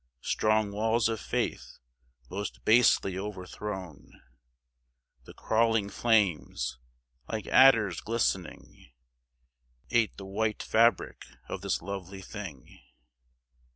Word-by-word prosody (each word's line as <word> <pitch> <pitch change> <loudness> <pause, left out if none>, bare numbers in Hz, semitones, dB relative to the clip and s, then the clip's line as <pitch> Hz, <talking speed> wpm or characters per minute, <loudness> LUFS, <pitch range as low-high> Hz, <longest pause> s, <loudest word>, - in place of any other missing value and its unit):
Strong 110 -1 +1
walls 110 +2 +1
of 110 -1 -2
faith, - - -3 0.5
most 100 +6 -6
basely 110 -5 +4
overthrown! 95 -3 -7 1.2
The - - -12
crawling 110 -2 +1
flames, 95 - 0 0.5
like 110 -3 -4
adders 110 -10 +5
glistening 95 - -3 1.0
Ate 115 -2 +1
the 95 - -8
white 105 +2 -2
fabric 115 +2 +2 0.2
of - - -5
this - - -2
lovely 95 0 -7
thing. - - -9
105 Hz, 90 wpm, -29 LUFS, 95-110 Hz, 1.2 s, adders